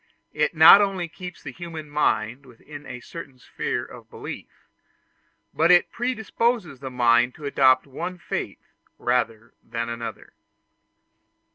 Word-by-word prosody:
It 150 Hz, +2 st, 0 dB
not 160 Hz, +6 st, +9 dB
only 195 Hz, -3 st, -1 dB
keeps 180 Hz, +1 st, -10 dB
the 135 Hz, -, -6 dB
human 165 Hz, 0 st, -8 dB
mind 140 Hz, -4 st, 0 dB
within 145 Hz, +4 st, -12 dB
a 125 Hz, -1 st, -8 dB
certain 145 Hz, -2 st, -10 dB
sphere -, -, -4 dB
of -, -, -13 dB
belief, -, -, -8 dB, 1.0 s
but 165 Hz, +2 st, +2 dB
it 175 Hz, -1 st, +5 dB
predisposes 230 Hz, -, -1 dB
the 135 Hz, 0 st, -6 dB
mind 120 Hz, 0 st, +3 dB
to 150 Hz, -, -10 dB
adopt 130 Hz, -2 st, +4 dB
one 170 Hz, +7 st, -6 dB
faith -, -, -5 dB, 0.3 s
rather 115 Hz, -2 st, -1 dB
than 115 Hz, 0 st, -4 dB
another. 115 Hz, 0 st, -7 dB
145 Hz, 130 wpm, -24 LUFS, 125-175 Hz, 1.0 s, not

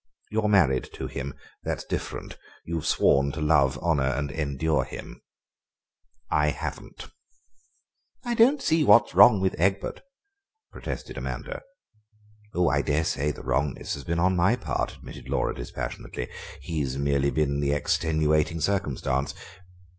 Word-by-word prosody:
You're 110 Hz, 0 st, +1 dB
married 75 Hz, -12 st, +3 dB
to -, -, -5 dB
him—that's 70 Hz, 0 st, -6 dB
different; -, -, -5 dB, 0.3 s
you've 80 Hz, -1 st, -3 dB
sworn 70 Hz, +1 st, +3 dB
to 80 Hz, -, -5 dB
love, 70 Hz, -4 st, +3 dB
honour, 80 Hz, -2 st, +1 dB
and 70 Hz, +1 st, -1 dB
endure 75 Hz, 0 st, 0 dB
him: -, -, -9 dB, 1.1 s
I 75 Hz, 0 st, +3 dB
haven't." -, -, -6 dB, 1.2 s
"I 240 Hz, -, 0 dB
don't 260 Hz, +5 st, +4 dB
see 160 Hz, 0 st, +3 dB
what's 115 Hz, -5 st, +6 dB
wrong 110 Hz, -5 st, +8 dB
with 95 Hz, 0 st, +1 dB
Egbert," 95 Hz, +3 st, 0 dB, 0.7 s
protested -, -, -6 dB
Amanda. -, -, -5 dB, 0.9 s
"Oh, 90 Hz, 0 st, +3 dB
I 70 Hz, +1 st, +2 dB
daresay 75 Hz, -1 st, 0 dB
the 75 Hz, -, -6 dB
wrongness 65 Hz, +2 st, -1 dB
has 70 Hz, -, -6 dB
been 85 Hz, +5 st, -2 dB
on 90 Hz, +2 st, +3 dB
my 95 Hz, +7 st, +3 dB
part," 125 Hz, -, -3 dB
admitted -, -, -11 dB
Laura -, -, 0 dB
dispassionately; -, -, -6 dB, 0.3 s
"he 80 Hz, +3 st, -3 dB
has 65 Hz, -2 st, -2 dB
merely 70 Hz, 0 st, +1 dB
been 70 Hz, -2 st, 0 dB
the 70 Hz, -1 st, +1 dB
extenuating 80 Hz, +1 st, +1 dB
circumstance. 70 Hz, -7 st, -1 dB
75 Hz, 130 wpm, -26 LUFS, 70-90 Hz, 1.2 s, wrong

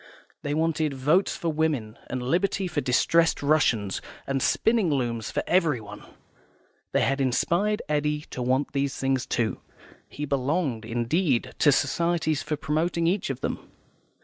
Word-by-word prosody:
They 145 Hz, 0 st, -2 dB
wanted 155 Hz, -2 st, 0 dB
Votes 150 Hz, +9 st, +2 dB
for 170 Hz, -, -2 dB
Women, 150 Hz, -9 st, -1 dB
and 130 Hz, -1 st, -3 dB
Liberty 185 Hz, +7 st, 0 dB
for 160 Hz, -4 st, -2 dB
Distressed 165 Hz, +6 st, +2 dB
Russians, 125 Hz, -10 st, +2 dB, 0.2 s
and 135 Hz, -1 st, -1 dB
spinning 225 Hz, -, +2 dB
looms 120 Hz, -6 st, -1 dB
for -, -, -2 dB
everyone. 130 Hz, -, 0 dB, 0.9 s
They -, -, +2 dB
had 135 Hz, +1 st, +1 dB
inspired 175 Hz, +11 st, +1 dB
Eddy 150 Hz, 0 st, 0 dB
to 125 Hz, -, -5 dB
want 130 Hz, +4 st, 0 dB
these 140 Hz, -1 st, -1 dB
things, 135 Hz, -1 st, -1 dB
too; 115 Hz, -2 st, -1 dB, 0.5 s
he 150 Hz, -, -5 dB
belonged, 140 Hz, -3 st, -1 dB
indeed, 120 Hz, +4 st, 0 dB
to 145 Hz, -, +6 dB
societies 160 Hz, +2 st, +1 dB
for 150 Hz, -, -2 dB
promoting 160 Hz, +5 st, 0 dB
each 180 Hz, 0 st, +1 dB
of 135 Hz, -, -4 dB
them. -, -, -2 dB
145 Hz, 145 wpm, -26 LUFS, 130-165 Hz, 0.9 s, to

